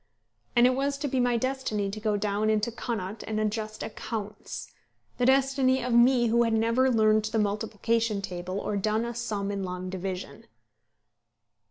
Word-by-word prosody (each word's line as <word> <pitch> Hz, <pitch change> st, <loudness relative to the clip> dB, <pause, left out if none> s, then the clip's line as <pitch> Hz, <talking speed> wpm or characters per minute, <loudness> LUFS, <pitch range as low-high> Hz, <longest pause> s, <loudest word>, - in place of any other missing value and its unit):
And 240 Hz, 0 st, +6 dB
it 255 Hz, -, +5 dB
was 280 Hz, +2 st, -1 dB
to 290 Hz, +1 st, -2 dB
be 265 Hz, -1 st, 0 dB
my 245 Hz, -1 st, +2 dB
destiny 230 Hz, -6 st, -1 dB
to 215 Hz, -, -6 dB
go 210 Hz, -1 st, 0 dB
down 205 Hz, +1 st, 0 dB
into 215 Hz, +2 st, +1 dB
Connaught 220 Hz, -3 st, -4 dB
and 215 Hz, -1 st, -1 dB
adjust 215 Hz, 0 st, -2 dB
accounts, 215 Hz, -1 st, -6 dB, 0.5 s
the 245 Hz, -, +3 dB
destiny 265 Hz, -1 st, +3 dB
of 250 Hz, -1 st, -1 dB
me 240 Hz, +1 st, +5 dB
who 235 Hz, +1 st, +3 dB
had 230 Hz, -1 st, +2 dB
never 230 Hz, +4 st, +3 dB
learned 215 Hz, -2 st, +3 dB
the 220 Hz, +1 st, -1 dB
multiplication 215 Hz, +1 st, 0 dB
table, 185 Hz, 0 st, -4 dB
or 205 Hz, -, -2 dB
done 215 Hz, +3 st, 0 dB
a 235 Hz, -, -4 dB
sum 210 Hz, -4 st, -3 dB
in 200 Hz, -1 st, -3 dB
long 180 Hz, 0 st, -5 dB
division! 190 Hz, 0 st, -5 dB
220 Hz, 170 wpm, -27 LUFS, 205-240 Hz, 0.5 s, And